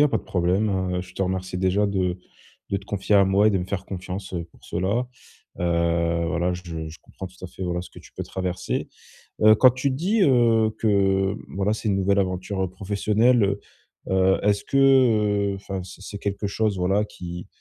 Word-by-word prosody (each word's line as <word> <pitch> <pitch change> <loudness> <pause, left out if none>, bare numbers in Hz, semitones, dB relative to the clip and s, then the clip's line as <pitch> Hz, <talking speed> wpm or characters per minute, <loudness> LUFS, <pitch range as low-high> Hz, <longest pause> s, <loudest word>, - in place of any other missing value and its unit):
y - - +7
a 150 - +5
pas - - +1
de - - -11
problème, 95 +4 +1 0.3
heu, - - -1
je 90 0 -11
te - - -2
remercie 95 -1 -2
déjà 95 +3 +2
de 95 -2 -1 0.5
de 100 - +1
te 100 - -8
confier 100 +1 -1
à 100 - +6
moi 95 +2 +3
et - - +5
de 100 - +1
me 90 - -3
faire 95 0 -4
confiance, 95 0 -6
heu, 85 -1 -3
pour 85 - -23
cela. 100 +8 -1 0.5
Heu, 85 -1 +1
voilà, 85 +3 0
je 85 -3 -6
je 80 +1 -11
comprends 95 - -9
tout 95 0 -21
à - - -3
fait, 95 - -9
voilà 90 -1 -1
ce 90 - -10
que - - -13
tu - - -17
peux - - -5
traverser. 90 -1 -3 0.5
Heu, 110 0 +8
quand 130 +3 +6
tu 130 +3 -1
dis, 185 +11 0
heu, 115 - +4
que, 95 -2 +2
voilà, 100 +2 0
c'est 110 - -4
une 100 - +2
nouvelle 100 +1 +2
aventure, 95 +1 -2
heu, 95 - -2
professionnelle, 105 +5 +2
heu, 100 0 0 0.5
heu, 95 0 +3
est-ce 100 0 +2
que, 135 - -1
heu 110 -7 +4
enfin 95 -1 -5
c'est 95 +1 -12
c'est 100 +1 -7
quelque 100 0 -3
chose 105 0 0
voilà 95 +3 +2
qui, 90 -3 -8
95 Hz, 215 wpm, -24 LUFS, 90-105 Hz, 0.5 s, Heu